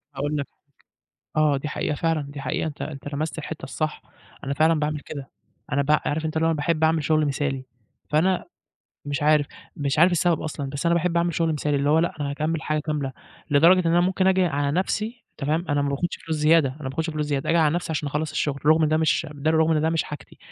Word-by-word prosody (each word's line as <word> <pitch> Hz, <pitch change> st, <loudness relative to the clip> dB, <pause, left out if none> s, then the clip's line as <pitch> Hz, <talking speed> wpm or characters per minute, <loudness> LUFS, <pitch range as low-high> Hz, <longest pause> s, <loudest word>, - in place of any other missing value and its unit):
أقول 145 Hz, +2 st, -1 dB
لك 140 Hz, -, -3 dB, 0.7 s
حاجة، 155 Hz, 0 st, -1 dB
آه، 145 Hz, -2 st, +3 dB
دي 145 Hz, -, -4 dB
حقيقة 150 Hz, 0 st, -2 dB
فعلًا، 165 Hz, -1 st, 0 dB
دي 140 Hz, 0 st, -8 dB
حقيقة 135 Hz, +4 st, -1 dB
أنت 150 Hz, -, -7 dB
أنت 145 Hz, -1 st, -6 dB
لمست 155 Hz, +3 st, -3 dB
الحتة 160 Hz, 0 st, -6 dB
الصح، 155 Hz, -1 st, -3 dB, 0.4 s
أنا 140 Hz, -, -2 dB
فعلًا 155 Hz, +2 st, +3 dB
باعمل 150 Hz, 0 st, -1 dB
كده 140 Hz, -3 st, -7 dB, 0.4 s
أنا 140 Hz, -, +2 dB
ب 140 Hz, -, -4 dB
عارف 150 Hz, +1 st, +1 dB
أنت 160 Hz, 0 st, -2 dB
اللي 160 Hz, +1 st, +2 dB
هو 165 Hz, -, +2 dB
باحب 160 Hz, +1 st, 0 dB
أعمل 160 Hz, -1 st, +3 dB
شغل 155 Hz, 0 st, +2 dB
مثالي، 140 Hz, -2 st, -2 dB, 0.4 s
فأنا 175 Hz, +5 st, +2 dB, 0.6 s
مش 145 Hz, 0 st, -3 dB
عارف 150 Hz, -1 st, +4 dB, 0.3 s
مش 140 Hz, 0 st, -1 dB
عارف 175 Hz, +2 st, +6 dB
السبب 175 Hz, -1 st, +2 dB
أصلًا، 145 Hz, -3 st, -4 dB
بس 140 Hz, +4 st, -3 dB
أنا 170 Hz, -, +4 dB
باحب 170 Hz, 0 st, 0 dB
أعمل 170 Hz, -1 st, +1 dB
شغل 165 Hz, -1 st, +1 dB
مثالي، 150 Hz, -1 st, 0 dB
اللي 140 Hz, +1 st, +1 dB
هو 155 Hz, -, +5 dB
لأ 170 Hz, -, +1 dB
أنا 140 Hz, -1 st, -1 dB
هاكمل 155 Hz, +3 st, -1 dB
الحاجة 155 Hz, 0 st, -1 dB
كاملة، 145 Hz, -4 st, -3 dB, 0.4 s
لدرجة 165 Hz, +6 st, +6 dB
إن -, -, +3 dB
أنا 175 Hz, -, +5 dB
ممكن 185 Hz, +1 st, +1 dB
آجي 190 Hz, -1 st, +4 dB
على 145 Hz, -3 st, 0 dB
نفسي 215 Hz, +6 st, -2 dB
تمام، 155 Hz, +4 st, -1 dB
أنا 145 Hz, 0 st, +1 dB
ماباخدش 140 Hz, +5 st, -1 dB
فلوس 160 Hz, -1 st, -1 dB
زيادة 150 Hz, -1 st, +4 dB
أنا 145 Hz, +4 st, -9 dB
ماباخدش 155 Hz, +5 st, -3 dB
فلوس 150 Hz, -1 st, -2 dB
زيادة، 140 Hz, -2 st, -1 dB
آجي 170 Hz, -, +3 dB
على 155 Hz, 0 st, +3 dB
نفسي 175 Hz, -1 st, -2 dB
عشان 150 Hz, -1 st, -2 dB
أخلص 150 Hz, +1 st, -2 dB
الشغل، 145 Hz, -2 st, -2 dB
رغم 155 Hz, +1 st, +5 dB
إن 155 Hz, -, +3 dB
ده 155 Hz, -, +2 dB
مش 160 Hz, +1 st, +1 dB
ده 145 Hz, +2 st, 0 dB
رغم 160 Hz, 0 st, +3 dB
إن 155 Hz, -, +2 dB
ده 160 Hz, -, +2 dB
مش 165 Hz, -1 st, +1 dB
حاجتي، 150 Hz, -, -10 dB
155 Hz, 235 wpm, -24 LUFS, 145-165 Hz, 0.7 s, عارف